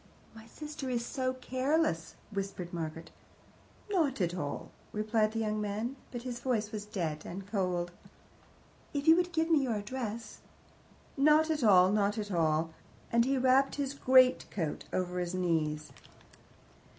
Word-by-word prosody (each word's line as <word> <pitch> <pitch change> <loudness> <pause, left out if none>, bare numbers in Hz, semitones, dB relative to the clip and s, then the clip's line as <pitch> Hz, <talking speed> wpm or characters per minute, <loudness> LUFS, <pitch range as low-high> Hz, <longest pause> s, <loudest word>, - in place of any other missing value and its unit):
"My 225 0 -13
sister 300 +1 -6
is 240 -1 -1
so 255 0 -1
careless," 255 - 0 0.2
whispered 195 -3 -4
Margaret. 165 -1 -5 0.8
"Not 325 - +1
at 175 -2 +1
all," 145 -6 -4 0.2
replied 215 0 +1
the - - -3
young 215 -1 -1
man; 215 +5 -2 0.2
but 240 -1 -6
his 245 -2 -4
voice 230 -4 -1
was 210 -2 -5
dead 160 -7 -3
and 190 +2 -7
cold. 180 -4 -1 1.0
"If 285 +1 -2
you 320 - +9
would 355 0 +1
give 325 0 0
me 310 -3 +5
your 245 -4 0
address 225 +1 -5 0.4
" - - -29
"Oh, - - 0
not 305 +2 +5
at 300 -5 -1
all, 185 -3 +6
not 205 0 +1
at 205 -1 -3
all;" 160 -2 +1 0.4
and 235 0 +4
he 270 +1 +1
wrapped 260 +1 +4
his 280 -1 -2
greatcoat 255 - +3
over 180 -1 -1
his 175 0 -2
knees. 155 -4 0
215 Hz, 155 wpm, -31 LUFS, 180-260 Hz, 1.0 s, you